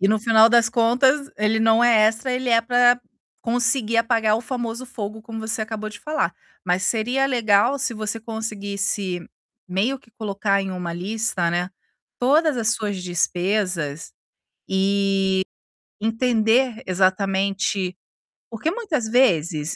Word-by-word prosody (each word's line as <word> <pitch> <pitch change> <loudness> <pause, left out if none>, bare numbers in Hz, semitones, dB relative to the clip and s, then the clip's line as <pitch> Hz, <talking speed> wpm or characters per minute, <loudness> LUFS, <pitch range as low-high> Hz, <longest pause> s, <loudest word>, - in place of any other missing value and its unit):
e, 195 - +3
no 215 +1 +2
final 225 +1 +5
das 235 -1 +4
contas, 255 +5 +2
ele 210 +1 +1
não 225 +1 +4
é 230 -3 +5
extra, 225 +4 -1
ele 255 0 -2
é 230 -1 +4
para 245 +1 +3 0.4
conseguir 230 -1 0
apagar 225 -2 +2
o - - -3
famoso 240 0 -4
fogo 220 -3 -7
como 225 -1 -8
você 220 0 -3
acabou 215 -1 -5
de 215 - -11
falar, 300 - -2 0.3
mas 180 0 0
seria 245 +6 +1
legal 235 +1 +2
se 240 -3 -1
você 215 +1 -3
conseguisse 200 -4 -3 0.4
meio 215 +9 0
que 230 - -26
colocar 200 -2 -1
em 195 -1 -4
uma 180 -2 -4
lista, 195 0 -1
né, 175 +2 -1 0.5
todas 295 +3 +3
as 220 -1 +1
suas 205 -3 -3
despesas, 175 -3 -1 0.6
e 195 +1 +1 0.9
entender 225 +1 +1
exatamente. 190 0 0 0.5
Porque 230 +8 -2
muitas 345 - -2
vezes, 170 - +2
220 Hz, 135 wpm, -22 LUFS, 195-240 Hz, 0.9 s, final